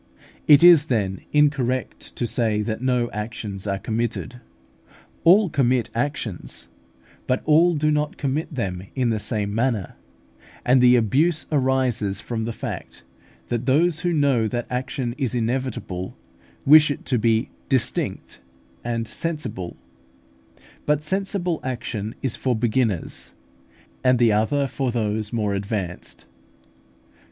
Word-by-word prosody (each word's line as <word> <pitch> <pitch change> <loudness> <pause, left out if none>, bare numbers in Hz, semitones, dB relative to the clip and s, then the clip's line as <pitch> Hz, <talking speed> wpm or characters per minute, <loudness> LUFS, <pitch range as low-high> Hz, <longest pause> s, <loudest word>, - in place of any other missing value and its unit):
It 145 +1 +8
is, 170 -4 +8
then, 100 -9 -1
incorrect 140 -4 0
to 120 - -1
say 110 -3 0
that 110 +1 -3
no 125 -2 +1
actions 105 -2 -5
are 100 -1 0
committed. 115 +4 -3 0.8
All 195 +5 +6
commit 130 -6 +1
actions, 120 - -3 0.6
but 125 - 0
all 165 +3 +4
do 150 0 +1
not 150 0 -1
commit 145 +4 -2
them 95 - -3
in 125 -3 +1
the 110 - -1
same 105 -1 -2
manner; 115 -5 -1 0.7
and 125 +1 +5
the 125 0 +7
abuse 145 - +2
arises 130 -8 +1
from 115 -2 -4
the 115 - -2
fact, 65 -11 -7 0.5
that 120 +1 -2
those 160 +4 +3
who 175 - 0
know 140 -8 +2
that 120 +2 -3
action 125 -1 -2
is 130 -3 -1
inevitable 115 - -3 0.5
wish 150 +1 +8
it 145 - -4
to 125 -3 +1
be 115 +1 +1 0.2
distinct 130 -4 0 0.4
and 115 -1 -2
sensible. 125 - -4 1.1
But 150 0 +2
sensible 190 -1 -1
action 115 -4 -4
is 130 -4 -1
for 130 -2 0
beginners, 110 -5 -1 0.7
and 125 0 +4
the 115 -2 +4
other 110 +7 +1
for 135 -1 -2
those 110 -2 -2
more 105 -3 -1
advanced. 100 -3 -4
125 Hz, 130 wpm, -23 LUFS, 110-145 Hz, 1.1 s, It